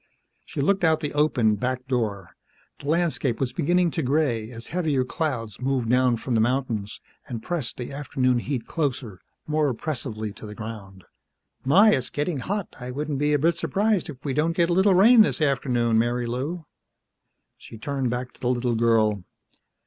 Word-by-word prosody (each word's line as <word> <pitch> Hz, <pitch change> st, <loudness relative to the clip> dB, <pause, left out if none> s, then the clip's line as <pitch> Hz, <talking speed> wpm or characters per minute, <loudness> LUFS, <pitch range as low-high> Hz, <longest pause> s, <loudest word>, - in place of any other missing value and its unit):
She -, -, -3 dB
looked 190 Hz, +6 st, +2 dB
out 160 Hz, -1 st, +4 dB
the 150 Hz, -2 st, -3 dB
open 130 Hz, -8 st, +2 dB
back 125 Hz, +1 st, -3 dB
door. 105 Hz, -8 st, -2 dB, 0.5 s
The 140 Hz, -, -9 dB
landscape 160 Hz, -7 st, 0 dB
was 130 Hz, -2 st, -1 dB
beginning 175 Hz, +1 st, +2 dB
to 165 Hz, -, -2 dB
gray 130 Hz, -6 st, 0 dB
as 115 Hz, -1 st, -10 dB
heavier 155 Hz, -7 st, 0 dB
clouds 125 Hz, -, -3 dB
moved 130 Hz, -3 st, 0 dB
down 125 Hz, -1 st, +3 dB
from 125 Hz, +2 st, -4 dB
the 110 Hz, -, +3 dB
mountains 115 Hz, -4 st, -1 dB, 0.3 s
and 115 Hz, -4 st, -6 dB
pressed 165 Hz, -9 st, -3 dB
the 125 Hz, -, -6 dB
afternoon 130 Hz, -3 st, 0 dB
heat 125 Hz, -2 st, -3 dB
closer, 130 Hz, -, -3 dB, 0.3 s
more 150 Hz, -1 st, +1 dB
oppressively 115 Hz, -5 st, -4 dB
to 110 Hz, -, -10 dB
the 105 Hz, -, -9 dB
ground. 105 Hz, -4 st, -8 dB, 0.6 s
"My, 195 Hz, +11 st, +6 dB
it's 130 Hz, -, 0 dB
getting 150 Hz, +2 st, -2 dB
hot. 200 Hz, +7 st, -4 dB
I 125 Hz, 0 st, -6 dB
wouldn't 145 Hz, +2 st, -3 dB
be 150 Hz, +1 st, +2 dB
a -, -, +4 dB
bit 165 Hz, +4 st, +2 dB
surprised 205 Hz, 0 st, 0 dB
if 140 Hz, -2 st, -10 dB
we 140 Hz, -, -1 dB
didn't 160 Hz, +4 st, +1 dB
get 170 Hz, 0 st, +3 dB
a -, -, +3 dB
little 190 Hz, +1 st, +4 dB
rain 225 Hz, +5 st, +7 dB
this 210 Hz, -, +2 dB
afternoon, 120 Hz, -6 st, +1 dB
Marilou." 125 Hz, +8 st, -2 dB, 0.9 s
She 115 Hz, -, -11 dB
turned 135 Hz, +2 st, -2 dB
back 125 Hz, +1 st, -4 dB
to -, -, -22 dB
the 125 Hz, -, -1 dB
little 125 Hz, -1 st, 0 dB
girl. 110 Hz, -4 st, +2 dB
130 Hz, 180 wpm, -25 LUFS, 115-155 Hz, 0.9 s, rain